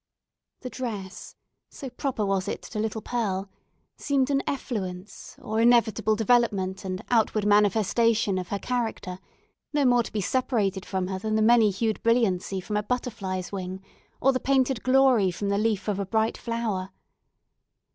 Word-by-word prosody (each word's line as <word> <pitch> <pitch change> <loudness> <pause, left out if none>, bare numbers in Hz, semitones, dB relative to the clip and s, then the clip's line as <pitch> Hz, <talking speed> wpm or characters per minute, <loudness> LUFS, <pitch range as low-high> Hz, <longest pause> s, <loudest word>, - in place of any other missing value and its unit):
The 255 - -5
dress, 210 -7 -6 0.3
so 275 - -8
proper 250 -6 -2
was 195 -1 0
it - - -4
to 215 - -6
little 220 0 -2
Pearl, 195 -5 -2 0.5
seemed 280 -1 0
an 275 0 +2
effluence, 200 -8 -5
or 220 +1 -1
inevitable 225 -3 +3
development 210 -4 +1
and 185 -1 -4
outward 220 -3 +2
manifestation 210 0 +3
of 180 - -5
her 200 - -2
character, 220 -6 -3 0.5
no 290 -2 +2
more 245 -1 +5
to - - -7
be 215 - -2
separated 205 -3 0
from 190 -1 -1
her 190 0 -4
than 215 +2 -2
the 220 - +3
many 230 -1 +5
hued 215 +3 -1
brilliancy 205 -5 +1
from 210 +3 -3
a - - +1
butterfly's 210 -6 -3
wing, 190 -1 -5 0.4
or 270 +1 +3
the 255 - 0
painted 265 -3 +1
glory 255 -6 +4
from 200 +3 -3
the 200 0 +1
leaf 215 -2 0
of 205 -2 -1
a 200 - -1
bright 220 +2 +1
flower. 225 -5 -3
215 Hz, 160 wpm, -26 LUFS, 195-240 Hz, 0.5 s, more